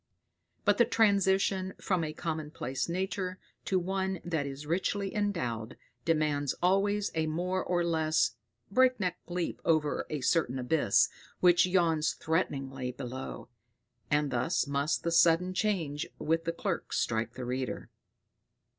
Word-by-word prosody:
But 205 Hz, +1 st, +3 dB
the 235 Hz, -, +7 dB
transition 195 Hz, -4 st, +2 dB
from 185 Hz, -4 st, 0 dB
a 155 Hz, -, -2 dB
commonplace 155 Hz, -4 st, -3 dB
nature 185 Hz, +1 st, -2 dB, 0.3 s
to 190 Hz, -, +1 dB
one 190 Hz, 0 st, -1 dB
that 160 Hz, -5 st, -1 dB
is 140 Hz, +2 st, -7 dB
richly 190 Hz, +4 st, -1 dB
endowed, 130 Hz, -, -2 dB, 0.3 s
demands 150 Hz, -3 st, +1 dB
always 200 Hz, +3 st, +2 dB
a 160 Hz, -1 st, 0 dB
more 180 Hz, +4 st, -1 dB
or 175 Hz, -1 st, +1 dB
less 160 Hz, -2 st, +2 dB, 0.4 s
breakneck 250 Hz, -6 st, +2 dB
leap 175 Hz, 0 st, -3 dB
over 155 Hz, -3 st, +1 dB
a 150 Hz, -2 st, -3 dB
certain 130 Hz, -1 st, +1 dB
abyss 125 Hz, -4 st, +3 dB, 0.3 s
which 175 Hz, 0 st, +5 dB
yawns 165 Hz, -4 st, +2 dB
threateningly 135 Hz, -6 st, -2 dB
below; 130 Hz, 0 st, -6 dB, 0.6 s
and 150 Hz, -1 st, +1 dB
thus 125 Hz, +8 st, +1 dB
must 140 Hz, +3 st, 0 dB
the 170 Hz, -, 0 dB
sudden 170 Hz, +2 st, +4 dB
change 170 Hz, -8 st, -1 dB
with 165 Hz, +1 st, 0 dB
the 165 Hz, -, +1 dB
clerk 170 Hz, +1 st, -3 dB
strike 115 Hz, +1 st, -1 dB
the 130 Hz, -, -5 dB
reader. 130 Hz, +1 st, -3 dB
165 Hz, 130 wpm, -30 LUFS, 145-185 Hz, 0.6 s, the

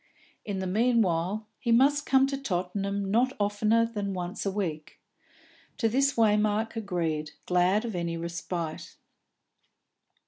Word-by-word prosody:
In 205 Hz, -2 st, -4 dB
the 190 Hz, -, -3 dB
meanwhile 210 Hz, -2 st, +1 dB
he 235 Hz, -, -1 dB
must 280 Hz, +5 st, +4 dB
come 265 Hz, 0 st, +5 dB
to 275 Hz, 0 st, -2 dB
Tottenham 195 Hz, -4 st, -2 dB
not 250 Hz, +4 st, +2 dB
oftener 210 Hz, +3 st, +2 dB
than 205 Hz, -4 st, -4 dB
once 180 Hz, +2 st, -4 dB
a -, -, +1 dB
week. 155 Hz, -7 st, -4 dB, 0.8 s
To 230 Hz, -, +2 dB
this 275 Hz, +4 st, +2 dB
Waymark 215 Hz, 0 st, +2 dB
agreed, 165 Hz, -8 st, -2 dB
glad 180 Hz, +5 st, +2 dB
of 225 Hz, -, -4 dB
any 170 Hz, -1 st, -2 dB
respite. 170 Hz, -1 st, -5 dB
205 Hz, 130 wpm, -28 LUFS, 180-230 Hz, 0.8 s, come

